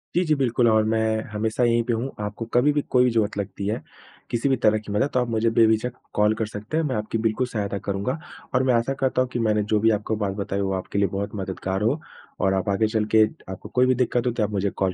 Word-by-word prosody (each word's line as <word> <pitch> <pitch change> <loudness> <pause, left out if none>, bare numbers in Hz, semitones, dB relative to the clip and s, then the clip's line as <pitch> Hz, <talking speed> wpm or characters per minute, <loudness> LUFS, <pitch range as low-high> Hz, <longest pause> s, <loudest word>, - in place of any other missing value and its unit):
जी, 175 - +3
जी, 155 -2 +3
बिल्कुल 125 -3 +2
और 110 -1 +4
मैं 110 0 +1
हमेशा 110 +3 -1
यहीं 120 0 +3
पे 120 - 0
हूँ। 115 +4 -2 0.2
आपको 105 +3 -5
कभी 125 +5 +4
भी 145 - +1
कोई 125 0 +4
ज़रूरत 110 -3 0
लगती 100 0 -4
है, 110 +2 -2 0.5
किसी 120 +4 0
भी 135 - +4
तरह 110 0 +5
की - - -6
मदद, 105 +7 +1
तो 125 - +3
आप 125 - 0
मुझे 115 0 +1
बेझिझक 115 +2 +3 0.2
कॉल 105 +1 +3
कर 110 - -1
सकते 105 +8 -5
हैं, 165 - +2
मैं 135 -4 -1
आपकी 105 +1 -2
बिल्कुल 110 +4 -1
सहायता 100 -4 -3
करूँगा। 100 +8 -1 0.4
और 125 - +3
मैं 130 -1 +3
आशा 115 +3 +1
करता 130 -1 +1
हूँ 130 - -1
कि 120 - -1
मैंने 105 -2 +2
जो 105 +1 +1
भी 110 +2 +4
आपको 110 +1 -2
बात 95 - -2
बताई 100 -1 -2
वो 95 0 -1
आपके 95 +2 -3
लिए 100 - +3
बहुत 100 +1 -4
मददगार 95 0 -3
हो, 115 +9 +1 0.4
और 95 0 +2
आप 95 +2 -1
आगे 100 +3 +2
चलके 110 0 +3 0.3
आपको 95 - -8
कोई 125 +1 +3
भी 130 0 +3
दिक्कत 125 0 0
हुई, 125 - +1
तो 115 - 0
आप 105 - 0
मुझे 100 -1 0
कॉल 95 -1 -1
110 Hz, 260 wpm, -24 LUFS, 105-125 Hz, 0.5 s, तरह